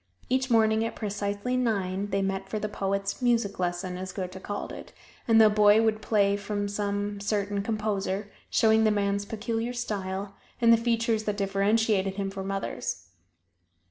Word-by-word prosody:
Each 260 +1 +1
morning 220 -1 +4
at 230 - -3
precisely 205 +3 -2
nine, 200 -5 0
they 195 0 0
met 195 0 -2
for 215 - -2
the 210 - -2
poet's 195 +1 -2
"music 230 -6 +1
lesson," 180 0 -2
as 185 0 -5
Goethe 185 -1 -6
called 205 - -5
it, - - -9 0.4
and 225 -1 +6
the 220 - +8
boy 210 +1 +5
would 220 -1 +1
play 200 -2 +2
from 205 0 -3
some 205 0 -2
certain 205 -1 -1
composer, 205 -2 -2 0.2
showing 220 0 +4
the 220 - +4
man's 200 -1 0
peculiar 225 +3 -3
style, 200 -4 -3 0.3
and 230 -1 +6
the - - +8
features 230 -1 0
that 210 -1 -1
differentiated 200 0 +1
him 195 -1 -2
from 195 0 -5
others. 125 - -4
205 Hz, 165 wpm, -27 LUFS, 195-220 Hz, 0.4 s, the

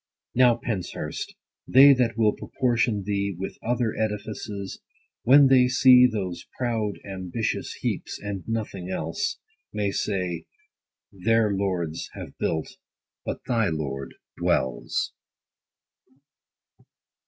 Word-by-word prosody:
Now, 125 -1 +5
Penshurst, 110 -6 -4 0.3
they 140 +2 +8
that 120 -4 +1
will 110 -2 +4
proportion 120 -4 0
thee 100 -1 -1
With 95 - -6
other 120 -1 0
edifices, 105 -2 -4 0.4
when 140 +3 +7
they 130 -2 +6
see 125 -1 +7
100 - - -6
Those 90 -3 -5
proud 115 -5 -1
ambitious 95 +3 -3
heaps, - - -3
and 100 -2 -4
nothing 105 -5 -3
else, 80 -3 -2 0.3
May 105 -1 -1
say, 90 -5 -2 0.6
their 105 +2 +2
lords 90 -5 -2
have - - -9
built, 80 -1 -2 0.5
but - - -4
thy 115 -5 +1
lord 70 -4 -4 0.2
dwells. 65 -2 0
105 Hz, 110 wpm, -25 LUFS, 95-120 Hz, 0.6 s, they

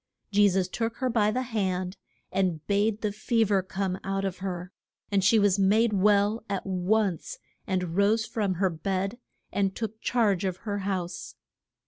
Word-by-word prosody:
Je 205 0 +5
sus 185 -1 +1
took 225 +4 -2
her 255 -1 0
by 215 -3 +3
the 255 +4 -1
hand, 190 -6 -2 0.4
and 180 -5 0
bade 205 +1 +1
the 210 - 0
fe 225 +2 +1
ver 200 -2 +2
come 190 0 -3
out 195 0 -1
of 190 -2 -3
her. 180 -1 -4 0.4
And 195 -1 +2
she 210 +4 +5
was 200 -2 +3
made 215 +4 +3
well 205 +2 +3
at 195 -2 -2
once, 190 0 0 0.3
and 180 -3 -1
rose 210 +3 +3
from 205 -5 -1
her 190 +1 +1
bed, 195 +7 -2 0.3
and 195 -1 0
took 220 -1 -5
charge 210 -7 +2
of 185 -2 -1
her 205 -1 -2
house. 185 -3 -4
200 Hz, 170 wpm, -27 LUFS, 185-215 Hz, 0.4 s, Je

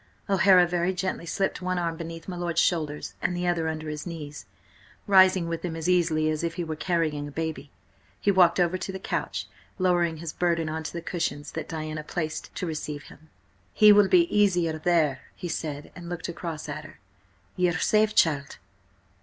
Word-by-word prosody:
O'Hara 190 -2 +6
very 175 +1 0
gently 180 -2 -3
slipped 195 +3 -1
one 185 0 -1
arm 170 -2 -1
beneath 165 0 -8
my 185 - -4
lord's 175 -1 -1
shoulders 155 -5 0
and 180 - -1
the 180 - -2
other 170 -2 +1
under 155 0 -4
his 150 +2 -5
knees, 150 -4 -7 0.6
rising 185 -3 +5
with 165 -1 -4
him 170 -2 -3
as 165 +1 -3
easily 165 -4 +2
as 155 +1 -3
if 170 0 -2
he 175 - -2
were 160 -1 -4
carrying 155 -4 -1
a - - -8
baby. 160 -1 -4 0.5
He 200 - +3
walked 180 -2 +5
over 180 +1 +2
to 190 - -4
the 190 - -5
couch, 190 - -3 0.3
lowering 175 -3 +2
his 160 0 -6
burden 170 -2 0
on 160 +1 -3
to - - -5
the 170 -1 -5
cushions 165 -4 -3
that - - -6
Diana 155 -1 -4
placed 155 -1 -4
to - - -3
receive 150 -3 -4
him. 155 +1 -16 0.5
"He 210 -1 +8
will 205 -1 +6
be 350 - +6
easier 175 -6 +2
there," 155 -5 +2
he 175 - -6
said, 150 -3 -4
and 175 -1 -9
looked 175 -2 -4
across 170 -2 -5
at - - -5
her. - - -14 0.6
"Ye 180 -1 +2
are - - -1
quite 160 - -1
safe, 215 0 +3
child?" 145 -4 +2
170 Hz, 200 wpm, -26 LUFS, 155-180 Hz, 0.6 s, He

